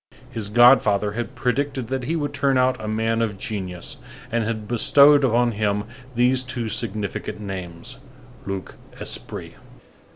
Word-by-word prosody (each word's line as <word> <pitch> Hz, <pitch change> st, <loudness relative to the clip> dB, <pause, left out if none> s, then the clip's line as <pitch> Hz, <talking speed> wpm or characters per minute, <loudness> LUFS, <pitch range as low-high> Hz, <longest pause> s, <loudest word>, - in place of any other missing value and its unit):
His 105 Hz, -3 st, -5 dB
god 120 Hz, +4 st, +7 dB
father 105 Hz, 0 st, +1 dB
had 120 Hz, +4 st, -5 dB
predicted 130 Hz, 0 st, -1 dB
that 130 Hz, -2 st, -2 dB
he 160 Hz, +6 st, -1 dB
would 145 Hz, -3 st, -2 dB
turn 140 Hz, -2 st, +2 dB
out 125 Hz, -2 st, +1 dB
a -, -, -4 dB
man 115 Hz, +1 st, 0 dB
of 105 Hz, -3 st, -1 dB
genius, 95 Hz, +5 st, -5 dB, 0.3 s
and 120 Hz, 0 st, +1 dB
had 110 Hz, -1 st, -3 dB
bestowed 140 Hz, +5 st, +5 dB
on 120 Hz, -1 st, +3 dB
him 105 Hz, -1 st, 0 dB, 0.3 s
these 125 Hz, +2 st, +4 dB
two 125 Hz, -3 st, -4 dB
significant 105 Hz, -1 st, -3 dB
names: 95 Hz, +4 st, -7 dB, 0.5 s
Luc 95 Hz, -1 st, -5 dB, 0.2 s
Esprit. -, -, -4 dB
115 Hz, 150 wpm, -23 LUFS, 105-130 Hz, 0.5 s, god